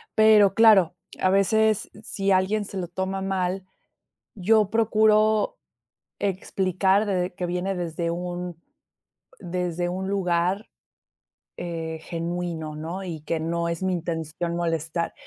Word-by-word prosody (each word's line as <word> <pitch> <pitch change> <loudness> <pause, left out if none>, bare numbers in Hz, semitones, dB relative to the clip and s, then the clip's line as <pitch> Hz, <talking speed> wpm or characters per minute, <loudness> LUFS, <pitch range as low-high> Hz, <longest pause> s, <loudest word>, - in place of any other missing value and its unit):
pero 215 -3 +6
claro, 205 -7 +6 0.2
a 185 - +3
veces, 215 +2 +2
si 200 -2 -1
alguien 195 +3 +2
se 200 - -7
lo 180 -2 -3
toma 190 +2 -3
mal, 190 -1 -1 0.7
yo 210 +1 +3
procuro 220 - +3 0.6
explicar 190 +1 +1
de 180 -2 -1
que 180 - -3
viene 180 +2 -2
desde 170 -1 -2
un 175 0 -4 0.8
desde 175 -1 -2
un 190 +2 -3
lugar, 185 +1 0 0.9
eh, 165 -2 -4
genuino, 170 -2 -4
¿no? 170 +5 -5
Y 165 -4 -5
que 160 +1 -2
no 170 +1 -1
es 170 +1 -3
mi 185 0 +1
intención 170 0 -3
molestar. 165 -1 -1
180 Hz, 120 wpm, -25 LUFS, 170-195 Hz, 0.9 s, pero